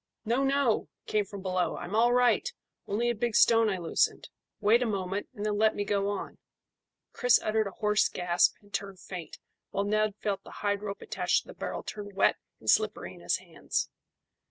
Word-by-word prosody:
"No, 240 +5 +1
no!" 275 -4 +2 0.2
came 210 -1 +1
from 200 -1 -9
below. 185 -1 0
"I'm 190 - -5
all 235 +2 +4
right. 250 - +3 0.4
Only 235 +4 +1
a - - -1
big 235 0 -2
stone 225 -1 +5
I 190 - -1
loosened. 170 -2 0 0.3
Wait 220 +3 +4
a 245 - +1
moment, 195 -1 -2
and 205 -1 -4
then 210 -1 0
let 220 0 +4
me 205 - -1
go 200 0 0
on." 205 - -5 0.7
Chris 245 -2 +4
uttered 215 -1 0
a 195 - -9
hoarse 210 -1 +2
gasp, 175 -1 +2
and 205 0 -22
turned 195 -2 -4
faint, 180 -4 -8 0.3
while 200 - -1
Ned 215 0 +1
felt 205 -2 -2
the - - -12 0.2
hide 205 0 +1
rope 200 -1 -5
attached - - 0
to - - -20
the - - -8
barrel - - -5
turn 205 -1 -7
wet 195 - +3 0.2
and - - -15
slippery - - +2
in - - -14
his - - +1
hands. - - -3
205 Hz, 200 wpm, -29 LUFS, 195-225 Hz, 0.7 s, stone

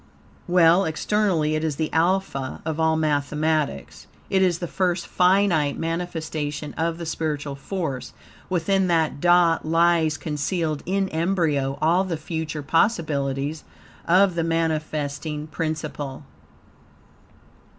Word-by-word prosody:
Well, 175 +1 +5
externally 160 -2 +1
it 155 0 -1
is 155 -3 -1
the 155 +1 -3
alpha 165 -5 0
of 160 0 -3
all 160 0 +3
mathematics. 150 - -1 0.2
It 190 - +3
is 180 -3 +3
the 175 - -4
first 180 0 -1
finite 180 -5 +2
manifestation 160 -3 -3
of 165 +1 -1
the 170 - -6
spiritual 150 -3 -3
force. 140 -3 -4 0.4
Within 185 +2 +1
that 160 -4 +1
dot 175 -1 +4
lies 165 -1 +2
concealed, 155 +1 -2
in 195 +1 +1
embryo, 160 -5 0
all 170 +4 +4
the 180 -4 -3
future 155 -1 -4
possibilities 150 -4 0 0.4
of 185 +2 +5
the 170 -1 -1
manifesting 155 -2 -2
principle. 155 -3 -4
160 Hz, 115 wpm, -23 LUFS, 150-175 Hz, 0.4 s, Well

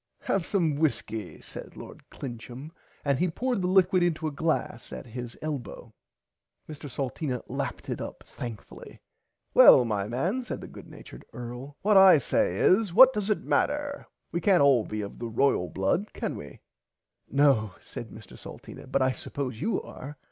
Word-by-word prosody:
Have 195 -4 -1
some 165 -7 +1
whiskey 110 - -2
said - - -10
lord - - -10
Clincham 125 +3 -8 0.3
and 140 -2 +1
he 180 - +2
poured 245 +5 -1
the 180 - 0
liquid 185 -1 +4
into 165 -2 0
a 155 - -1
glass 160 +3 -2
at - - -7
his 120 0 -7
[Pg - - -23
54] 155 - -4
elbow. 140 -8 -6 0.7
Mr. 150 -1 -8
Salteena 130 -1 -3
lapped - - -4
it - - -4
up - - -7
thankfully. 115 -4 -9 0.5
Well 125 - +8
my 105 -3 -1
man 170 - -1
said 245 - -5
the - - -9
good - - -12
natured - - -12
earl 125 +4 -8
what 210 0 +5
I 190 -3 +9
say 95 -8 0
is 195 - +3
what 260 0 +9
dose 210 -2 -2
it 210 - 0
matter 290 -1 -1 0.2
we 170 - -2
cant 180 -4 +4
all 135 -6 +4
be 110 0 -3
of 100 - -8
the 120 - -4
Blood 115 - -12 0.2
royal 95 - -1
can - - -3
we. 70 - -10 0.7
No 135 -8 +3
said - - -9
Mr - - -13
Salteena - - -11
but 135 - +2
I 130 - +2
suppose 130 -2 -5
you 220 -2 0
are. 145 +2 -10
140 Hz, 175 wpm, -27 LUFS, 120-180 Hz, 0.7 s, I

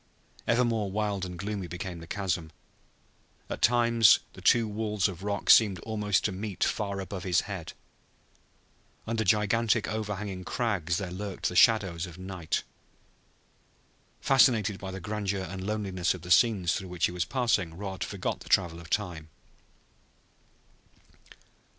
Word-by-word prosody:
Ever 125 +2 +3
more 110 -4 -1
wild 100 -2 -1
and 90 -1 -7
gloomy 100 -1 -4
became 90 0 -6
the 80 - -11
chasm. 90 -5 -2 1.0
At - - -4
times 115 -3 +5 0.2
the - - -12
two 115 -2 +4
walls 105 -2 0
of 95 -3 -7
rock 100 0 -3
seemed 105 -5 +6
almost 105 -5 0
to 105 - +1
meet 100 +1 -3
far 100 -2 -1
above 95 0 -5
his 90 -2 +2
head; 95 -5 -7 1.3
under 115 -1 -1
gigantic, 105 +2 +2
overhanging 105 -3 -4
crags 95 -8 -1
there 95 -3 -4
lurked 100 +1 -3
the 90 - -7
shadows 95 -4 +4
of 85 -1 -11
night. 95 -3 -3 1.6
Fascinated 115 -7 +3
by 95 - -6
the 95 0 -6
grandeur 100 0 -3
and 95 +1 -6
loneliness 95 -5 -1
of 85 - -11
the 90 - -6
scenes 90 -3 +4
through 95 0 -4
which 90 -2 0
he - - -1
was 90 -1 -1
passing 105 -10 0
Rod 95 -1 -4
forgot - - -3
the - - -13
travel 85 -3 +2
of 85 -1 -12
time. 85 -7 -2
100 Hz, 145 wpm, -28 LUFS, 90-105 Hz, 1.6 s, seemed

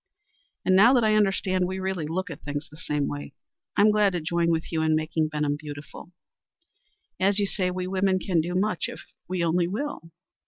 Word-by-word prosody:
And 185 - +4
now 220 +7 +7
that 245 -3 +4
I 215 -1 +3
understand 195 -3 +2
we 190 +1 -3
really 190 -4 -2
look 185 +3 -3
at 145 - -9
things 145 0 -4
the 150 - -15
same 150 -3 -1
way, 70 0 -6 0.4
I'm 210 +1 +6
glad 210 -2 +3
to 175 - 0
join 170 +1 0
with 165 -1 -1
you 160 -1 0
in 160 0 +2
making 155 0 0
Benham 150 -1 -1
beautiful. 150 +3 -9 1.1
As 195 +1 +3
you 205 - +3
say, 185 -2 -1
we 180 0 -3
women 190 0 +1
can 180 -3 +1
do 175 +3 -4
much 195 -1 0
if - - -8 0.3
we 180 -1 -1
only 170 +1 +2
will. 205 - -4
180 Hz, 200 wpm, -26 LUFS, 155-190 Hz, 1.1 s, now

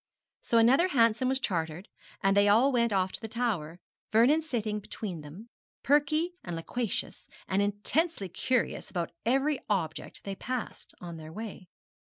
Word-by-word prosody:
So 230 - +1
another 260 +10 +5
Hansom 235 -4 +3
was 265 0 +1
chartered, 170 -3 -2 0.4
and 195 0 +4
they 200 0 +5
all 230 +7 +5
went 235 -2 +2
off 190 -2 +1
to - - -8
the 225 - -4
Tower, 210 -9 -2 0.3
Vernon 245 +9 +5
sitting 225 -9 -2
between 195 -4 -6
them, 170 +11 -11 0.3
perky 300 +5 +2
and 175 -2 -5
loquacious, 220 +7 -3 0.2
and 190 +1 +1
intensely 205 - 0
curious 250 +7 -1
about 175 -3 -3 0.2
every 270 +3 +2
object 170 -6 -2
they 195 - -4
passed 250 +5 -5
on 170 -2 -7
their 155 0 -9
way. 200 -2 -8
215 Hz, 155 wpm, -29 LUFS, 185-255 Hz, 0.4 s, another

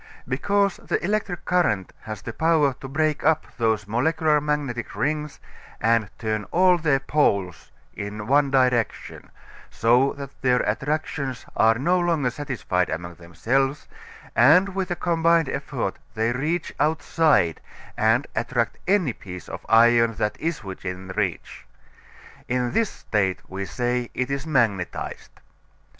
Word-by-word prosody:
Because 200 +9 +1
the - - -2
electric 195 -4 -2
current 150 - +1
has 110 -1 -7
the 115 - -6
power 160 -3 +2
to 135 - -6
break 155 +2 0
up 160 +1 +2
these 110 -2 +1
molecular 150 +6 +2
magnetic 145 -5 -2
rings 150 -1 -2 0.4
and 115 -1 +2
turn 110 -2 -2
all 180 0 +3
their 155 -3 +1
like 135 - -11
poles 100 - 0 0.2
in 105 +1 -6
one 140 +4 +3
direction, 125 -4 0 0.4
so 125 +4 +3
that 140 -1 -8
their 125 -1 +3
attractions 135 +2 -2
are 115 +1 +4
no 175 +10 +1
longer 165 -7 +1
satisfied 115 -10 -2
among 85 +3 -4
themselves, 115 - -1 0.5
and 155 - +6
with 190 -1 -3
a 175 - -1
combined 165 -2 +2
effort 135 -7 -3 0.2
they 110 +1 +1
reach 155 +7 -2
outside 155 - +2 0.3
and 110 +5 +2
attract 115 -1 -1
any 185 - +2
piece 90 -5 -10
of - - -7
iron 115 0 +5
that 105 - -1
is 165 -6 -3
within 95 -1 -7
reach. 95 -2 -3 0.8
In 125 -1 0
this 225 - +1
state 95 -3 -1
we 95 +1 -5
say 120 +3 -2
it 130 +1 -2
is 140 +2 -3
magnetized. 115 - -1
130 Hz, 135 wpm, -24 LUFS, 110-155 Hz, 0.8 s, and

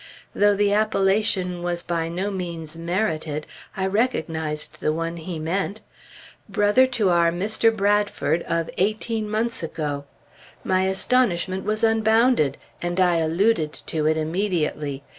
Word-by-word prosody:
Though 205 0 +4
the 205 0 +2
appellation 195 -3 +1
was 175 0 -2
by 165 -1 -2
no 185 +4 -2
means 170 -4 -5
merited, 165 -3 -2 0.3
I 190 - 0
recognized 160 -8 -1
the - - +1
one 165 +2 -3
he 170 +1 -6
meant. 195 +6 -2 0.7
Brother 205 +6 +4
to 225 -7 +1
our 170 -1 +4
Mr. 215 +6 +2
Bradford 205 -7 +1
of 165 -1 -1
eighteen 215 +2 0
months 225 +2 -1
ago! 150 -3 -4 0.6
My 185 0 +1
astonishment 190 -3 +1
was 215 +2 0
unbounded, 225 - +3 0.2
and 175 +1 -2
I 180 -2 +4
alluded 165 0 +1
to 155 -1 -3
it 155 0 +2
immediately. 155 -4 -1
185 Hz, 130 wpm, -23 LUFS, 165-210 Hz, 0.7 s, Though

